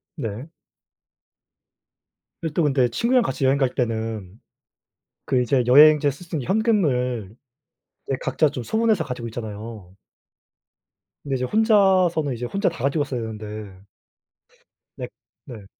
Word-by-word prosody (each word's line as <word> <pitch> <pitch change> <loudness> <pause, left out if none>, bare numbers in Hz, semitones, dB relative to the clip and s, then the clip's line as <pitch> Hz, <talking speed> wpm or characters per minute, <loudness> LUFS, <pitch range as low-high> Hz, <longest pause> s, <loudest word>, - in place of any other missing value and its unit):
네. 125 +2 -6 1.9
예 160 - -1
또 170 - +2
근데 135 -4 +3
친구랑 245 - +2
같이 135 - -2
여행 135 +1 +3
갈 135 -2 +2
때는 110 -5 -3 0.9
그 130 -2 +1
이제 125 +1 +2
여행지에서 145 +1 +6
쓸 180 - -13
수 165 - -9
있는 130 - -5
현금을 125 - 0 0.7
이제 135 - -1
각자 155 - +1
좀 130 -3 -6
소분해서 220 -7 +1
가지고 125 -2 -5
있잖아요. 110 -4 -8 1.3
근데 135 -2 -2
이제 125 0 -1
혼자서는 190 - +3
이제 120 +1 -5
혼자 195 - -1
다 160 -7 -9
가지고 145 +2 +1
있어야 130 -4 -4
되는데. 105 -3 -8 1.1
네 - - -6 0.4
네. 110 -6 -10
130 Hz, 265 characters per minute, -23 LUFS, 115-160 Hz, 1.9 s, 여행지에서